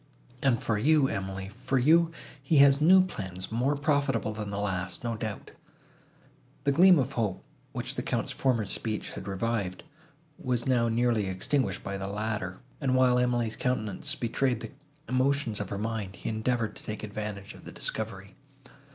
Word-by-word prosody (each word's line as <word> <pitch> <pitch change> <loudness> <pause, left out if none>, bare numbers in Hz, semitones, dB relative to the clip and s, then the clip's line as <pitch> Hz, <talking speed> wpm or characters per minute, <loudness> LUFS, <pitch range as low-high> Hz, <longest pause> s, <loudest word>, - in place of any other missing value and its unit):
And 130 -4 +3
for 105 -2 0
you, 150 +2 +4
Emily, 95 -2 -4
for 135 - +1
you, 160 +6 +5 0.3
he 140 +3 +2
has 140 0 +7
new 185 +4 +7
plans 95 - -6
more 125 +6 +1
profitable 140 -6 +1
than 105 -1 -5
the 100 - -4
last, 95 -2 -2
no 120 -1 -1
doubt." 110 -1 -5 1.1
The 140 - +3
gleam 180 +5 +7
of 135 -1 0
hope, 110 -7 -2 0.3
which - - -3
the - - -3
Count's - - -2
former 120 -5 +1
speech 110 +2 -3
had 95 - -8
revived, 100 -1 -2 0.6
was 125 -2 -1
now 120 -3 +2
nearly 115 -3 +2
extinguished 100 +2 0
by 100 0 -3
the 95 - -3
latter; 105 -2 -3 0.2
and, 130 -2 +2
while 125 -1 +4
Emily's 120 -2 +1
countenance 125 +3 -1
betrayed 120 -1 0
the - - -7 0.4
emotions 130 -3 +1
of 105 - -4
her 100 - -3
mind, 105 -2 -3
he - - -5
endeavoured 110 0 -1
to - - -9
take 110 0 -5
advantage 105 -1 -5
of - - -14
the - - -9
discovery. 100 -3 -4
115 Hz, 170 wpm, -29 LUFS, 100-135 Hz, 1.1 s, has